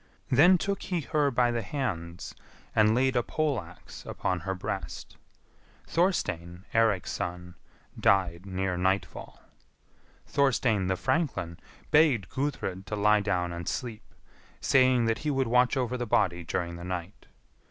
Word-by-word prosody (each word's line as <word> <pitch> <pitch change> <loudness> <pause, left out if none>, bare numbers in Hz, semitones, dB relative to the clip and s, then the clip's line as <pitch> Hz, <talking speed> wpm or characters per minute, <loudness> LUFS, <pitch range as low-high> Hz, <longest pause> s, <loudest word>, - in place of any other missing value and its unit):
Then 175 +9 +6
took 200 +3 -2
he 180 -3 -2
her 150 0 +1
by 120 -2 +2
the 120 -1 -1
hands 95 - -4 0.4
and 110 0 +4
laid 130 +1 +2
a 120 - +3
pole 145 -1 -1
axe 85 0 -13
upon 90 -1 -2
her 95 +3 -3
breast. 95 -6 -6 0.7
Thorstein, 90 - -1
Eirik's 110 -5 +2
son, 90 0 -5 0.5
died 90 -3 +2
near 95 -1 -2
nightfall. 95 +2 -2 0.8
Thorstein, 120 -8 +1
the 95 - +1
franklin, 95 - -1 0.3
begged 150 - +4
Gudrid 130 -9 -3
to 105 - -3
lie 105 +1 +4
down 90 -4 -1
and 85 0 -4
sleep, 115 -4 -6 0.4
saying 130 -2 +4
that 115 0 0
he 150 - -2
would 135 -2 +1
watch 125 +3 +3
over 125 -1 -1
the 120 -1 -3
body 90 -5 +1
during 85 +1 -3
the 85 - -9
night. 90 +1 -6
105 Hz, 140 wpm, -28 LUFS, 90-130 Hz, 0.8 s, Then